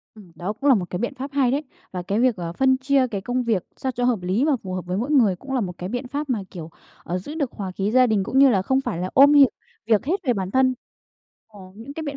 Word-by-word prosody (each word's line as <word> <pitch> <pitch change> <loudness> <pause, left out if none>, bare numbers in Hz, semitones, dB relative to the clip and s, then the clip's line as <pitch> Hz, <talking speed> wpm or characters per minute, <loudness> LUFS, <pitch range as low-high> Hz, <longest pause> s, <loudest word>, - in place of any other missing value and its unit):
Ừm, 195 -6 -15
đó 190 +4 -4
cũng 275 +6 0
là 265 - +7
một 180 -4 -3
cái 180 - -4
biện 240 +4 -3
pháp 270 +2 -6
hay 265 -3 +2
đấy. 285 +3 -1 0.3
Và 180 -1 -4
cái 200 +4 -1
việc, 250 -1 +3
ờ, 170 -2 -5
phân 260 +3 +2
chia 265 0 +2
cái 205 -5 -4
công 245 +5 -2
việc 220 -7 0
sao 260 - -2
cho 245 0 -3
hợp 240 -6 +1
lý 190 +10 0
và 310 - +2
phù 185 -1 -5
hợp 185 - -4
với 180 +1 -3
mỗi 245 +8 -2
người 230 -10 +4
cũng 270 +9 -8
là 255 - +1
một 180 -4 -5
cái 180 +2 -5
biện 245 +2 -4
pháp 285 +2 -4
mà, 230 -5 0
kiểu, 165 -3 -8 0.3
ờ, 180 +2 -3
giữ 290 +12 -7
được 285 -6 -2
hòa 195 -3 -6
khí 195 +3 -2
gia 255 +1 +5
đình 210 -4 +1
cũng 265 - 0
như 275 -1 +7
là 200 -6 +2
không 265 +7 +1
phải 170 - -4
là 180 +2 -3
ôm 280 +2 +7
việc 280 -3 +7 0.4
việc 215 0 +2
hết 335 +7 +1
về 250 - +2
bản 190 -3 -4
thân. 260 -1 +3 0.7
Ờ, 210 -2 -16
những 230 +7 -10
cái 320 - -5
biện 285 -2 -5
240 Hz, 300 wpm, -23 LUFS, 190-270 Hz, 0.7 s, là